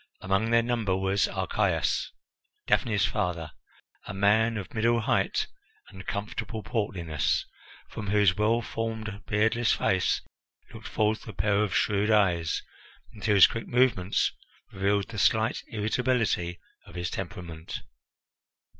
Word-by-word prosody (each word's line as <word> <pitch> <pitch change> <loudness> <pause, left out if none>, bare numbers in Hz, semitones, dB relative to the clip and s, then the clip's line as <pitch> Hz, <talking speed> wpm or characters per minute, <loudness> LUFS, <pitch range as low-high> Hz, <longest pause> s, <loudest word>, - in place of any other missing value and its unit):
Among 95 +4 +1
their 115 0 +4
number 115 -6 0
was 95 +1 +1
Archias, - - 0 0.5
Daphne's 105 -4 +2
father, 85 -4 -2 0.6
a - - -5
man 110 +3 +3
of 100 - -7
middle 115 +1 +2
height - - +1 0.4
and 95 -1 -11
comfortable 110 +1 -4
portliness, 95 - -1 0.4
from 105 -2 -7
whose 100 -3 +4
well 115 +3 +2
formed, 110 -2 -4
beardless 110 +2 +2
face 95 -1 +1 0.5
looked - - -9
forth 110 0 0
a 110 - -7
pair 100 +3 +1
of 95 -7 -2
shrewd 105 +6 +2
eyes, 90 -7 +2 0.5
and 105 - -12
whose 100 -2 +7
quick 115 - -3
movements 120 -7 +2 0.4
revealed 100 +1 0
the 110 -3 -5
slight 110 +3 +2
irritability 110 -5 0 0.3
of - - -13
his 85 0 -3
temperament. 85 -3 -6
105 Hz, 125 wpm, -28 LUFS, 95-110 Hz, 0.6 s, whose